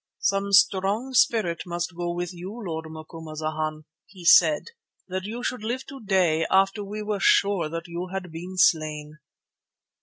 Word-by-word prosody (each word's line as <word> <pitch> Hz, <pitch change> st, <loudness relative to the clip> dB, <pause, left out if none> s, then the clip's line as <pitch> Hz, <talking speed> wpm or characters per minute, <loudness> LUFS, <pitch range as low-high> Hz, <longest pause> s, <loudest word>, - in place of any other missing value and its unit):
"Some 195 Hz, 0 st, +1 dB
strong 200 Hz, +5 st, +3 dB
spirit 215 Hz, -9 st, +2 dB
must 175 Hz, 0 st, -3 dB
go 175 Hz, 0 st, -2 dB
with 175 Hz, +1 st, -4 dB
you, 180 Hz, +2 st, -7 dB
Lord 160 Hz, -2 st, -4 dB
Macumazana," 155 Hz, -1 st, -5 dB, 0.3 s
he 185 Hz, -3 st, -13 dB
said, 165 Hz, -, +5 dB, 0.4 s
"that 185 Hz, 0 st, -4 dB
you 235 Hz, +4 st, -5 dB
should 250 Hz, -3 st, -3 dB
live 245 Hz, +4 st, -3 dB
today, 190 Hz, -11 st, +1 dB
after 195 Hz, +2 st, +2 dB
we 210 Hz, +2 st, -6 dB
were 210 Hz, -1 st, -2 dB
sure 195 Hz, -4 st, +3 dB
that 165 Hz, +2 st, -5 dB
you 170 Hz, +2 st, -5 dB
had 190 Hz, -3 st, -5 dB
been 180 Hz, +3 st, -8 dB
slain." 155 Hz, -3 st, +1 dB
180 Hz, 150 wpm, -25 LUFS, 165-200 Hz, 0.4 s, said